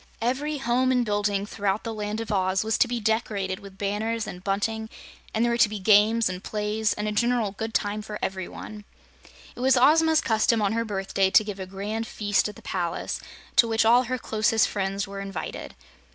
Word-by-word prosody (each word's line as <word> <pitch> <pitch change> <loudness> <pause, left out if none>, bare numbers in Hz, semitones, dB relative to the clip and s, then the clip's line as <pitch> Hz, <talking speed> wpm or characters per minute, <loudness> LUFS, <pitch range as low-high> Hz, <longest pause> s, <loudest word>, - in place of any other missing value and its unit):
Every 275 +6 -1
home 255 0 +1
and 250 -2 +2
building 205 -1 0
throughout 200 0 -2
the 225 - -4
Land 210 0 -3
of 225 -1 -5
Oz 190 -1 +1
was 220 0 0
to - - +5
be 240 0 -2
decorated 205 -4 -1
with 195 -1 -13
banners 210 +3 -2
and 180 0 -8
bunting, 220 +3 -1 0.4
and 225 +2 +1
there 240 - +1
were 235 - -1
to 215 - +5
be 210 - -4
games, 215 +3 +4
and 185 0 -5
plays, 210 0 -1
and 210 - -3
a - - 0
general 235 -1 +1
good 220 +3 -5
time 210 -1 -1
for 210 0 -6
every 190 -1 -3
one. 210 -1 -9 0.7
It - - -12
was 260 +1 +4
Ozma's 320 +4 +5
custom 225 0 +2
on 205 0 +1
her 230 0 0
birthday 195 -2 0
to 215 - +5
give 205 -2 -6
a 190 - -5
grand 210 +4 -4
feast 205 -1 0
at 210 - -10
the - - -15
palace, 175 -3 -3 0.4
to 235 - +7
which 225 0 +2
all 240 +3 +5
her 255 +2 -2
closest 220 -1 +1
friends 195 0 -2
were 195 0 -7
invited. 195 -3 -6
215 Hz, 210 wpm, -25 LUFS, 200-230 Hz, 0.7 s, to